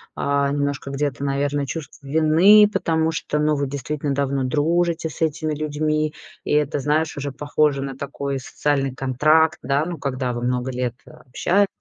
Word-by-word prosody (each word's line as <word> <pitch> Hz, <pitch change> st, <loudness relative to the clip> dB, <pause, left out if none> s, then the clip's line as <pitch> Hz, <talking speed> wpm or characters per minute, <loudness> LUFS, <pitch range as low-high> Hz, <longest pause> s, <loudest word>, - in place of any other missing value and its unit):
а, 140 Hz, 0 st, +1 dB
немножко 145 Hz, -1 st, -2 dB
где-то, 140 Hz, -1 st, -2 dB
наверное, 140 Hz, +1 st, 0 dB
чувство 145 Hz, -1 st, -7 dB
вины, 165 Hz, +8 st, +6 dB
потому 160 Hz, -3 st, +1 dB
что, 150 Hz, -2 st, -2 dB
ну, 150 Hz, 0 st, +2 dB
вы 140 Hz, -1 st, -1 dB
действительно 140 Hz, +1 st, -3 dB
давно 140 Hz, -1 st, 0 dB
дружите 165 Hz, +3 st, +1 dB
с -, -, -11 dB
этими 155 Hz, 0 st, 0 dB
людьми. 155 Hz, 0 st, -1 dB, 0.3 s
И -, -, -3 dB
это, 145 Hz, -1 st, +1 dB
знаешь, 150 Hz, +2 st, 0 dB
уже 140 Hz, 0 st, -3 dB
похоже 145 Hz, -1 st, +1 dB
на 135 Hz, -1 st, -5 dB
такой 140 Hz, -1 st, -4 dB
социальный 135 Hz, 0 st, -1 dB
контракт, 155 Hz, +5 st, +2 dB
да, 140 Hz, +2 st, +1 dB
ну, 175 Hz, -1 st, -5 dB
когда 130 Hz, -3 st, -2 dB
вы 120 Hz, 0 st, -4 dB
много 125 Hz, +1 st, -1 dB
лет 125 Hz, -1 st, -2 dB
общались, 180 Hz, +10 st, 0 dB
145 Hz, 165 wpm, -22 LUFS, 135-155 Hz, 0.3 s, вины